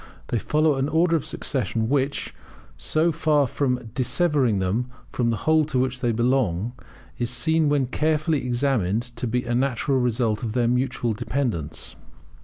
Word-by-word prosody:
They 120 - 0
follow 150 +4 +2
an 135 +2 0
order 165 +1 +3
of 155 - -2
succession 115 -4 -1
which, 140 +2 -1 0.4
so 160 +2 +1
far 150 -3 +2
from 125 -3 -2
dissevering 135 - +2
them 100 +7 -1 0.2
from 120 -2 0
the 115 - 0
whole 155 0 +4
to 145 -3 -2
which 130 0 0
they 120 -2 +1
belong, 120 -3 +1 0.5
is 120 -1 0
seen 150 +6 +2
when 145 -2 +2
carefully 155 +2 0
examined 120 -5 +1
to 125 0 -5
be 125 +2 0
a 120 - -2
natural 135 +2 +1
result 115 -3 0
of 110 -3 -3
their 120 -1 +2
mutual 125 -1 0
dependence. 105 - -3
125 Hz, 160 wpm, -24 LUFS, 115-145 Hz, 0.5 s, whole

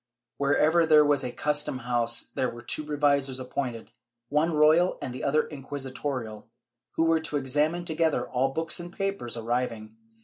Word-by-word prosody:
Wherever 150 +4 +3
there 155 -2 +6
was 145 -2 +2
a 125 - -3
custom 150 0 0
house, 120 -2 +1
there 130 - 0
were 120 0 -10
two 125 +5 -2
revisors 140 -3 +1
appointed, 130 -2 -5 0.4
one 150 +4 +2
royal 155 +4 +4
and 130 - -5
the 130 - -7
other 155 +2 +2
inquisitorial, 130 -5 -5 0.5
who 165 - +1
were 165 0 +3
to 160 -2 -3
examine 150 +6 0
together 160 -1 0
all 130 +2 0
books 160 +5 -1
and 175 0 -7
papers 195 - -3
arriving. 115 -2 -3
140 Hz, 160 wpm, -27 LUFS, 125-155 Hz, 0.5 s, there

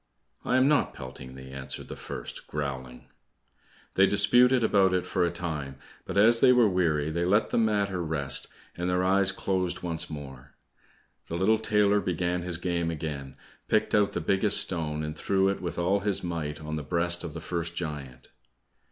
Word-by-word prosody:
"I 125 - +1
am 130 +1 +4
not 145 -1 +2
pelting 65 0 -9
thee," 65 0 -10
answered 65 0 -5
the - - -7
first, - - -7
growling. 65 -4 -5 0.9
They 95 +1 +5
disputed 125 +5 +4
about 95 -4 +3
it 90 - -1
for 90 0 0
a 85 - +2
time, 80 -6 -5 0.3
but - - -4
as 115 +3 +6
they 125 - +6
were 125 -3 +5
weary 80 -5 +1
they 85 +2 -1
let 100 +5 +2
the - - +2
matter 100 -5 +1
rest, 75 -4 -1 0.3
and 90 +1 -2
their 90 0 +1
eyes 95 +1 +3
closed 95 -2 -2
once 85 -2 -2
more. 70 -3 -9 0.7
The 85 - -4
little 110 +5 +3
tailor 105 -2 +2
began 90 0 -1
his 90 -1 -2
game 85 -1 -1
again, 75 -4 -5 0.3
picked - - +1
out 105 -1 +3
the - - -2
biggest 100 +1 +2
stone, 75 -4 -1
and 75 0 -4
threw 95 +4 +1
it 100 - -3
with 85 -2 -4
all 90 +4 +2
his 100 0 0
might 80 -4 -4
on 75 0 -5
the - - -3
breast 85 +3 +1
of 85 -4 -6
the - - -4
first 85 +1 -4
giant. 75 -7 -6
85 Hz, 185 wpm, -27 LUFS, 75-100 Hz, 0.9 s, as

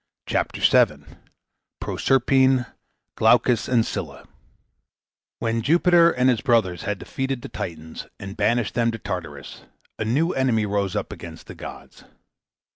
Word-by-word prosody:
CHAPTER - - -2
VII - - +3 0.7
PROSERPINE 130 -1 +2 0.5
GLAUCUS 120 -3 +3
AND 120 -3 +2
SCYLLA 80 -8 -6 1.1
When 115 0 -1
Jupiter 170 +5 +5
and 125 -5 +1
his 125 -4 +2
brothers 110 -8 +1
had 105 -2 -2
defeated 135 +3 -4
the - - -7
Titans 80 -6 -7
and 100 0 -7
banished 115 +1 +1
them 115 0 +1
to 115 - -3
Tartarus, 80 - -7 0.3
a - - 0
new 150 +10 +1
enemy 125 -5 +1
rose 100 -1 -1
up 105 - -3
against 80 -2 -10
the - - -9
gods. - - -11
115 Hz, 130 wpm, -23 LUFS, 100-130 Hz, 1.1 s, Jupiter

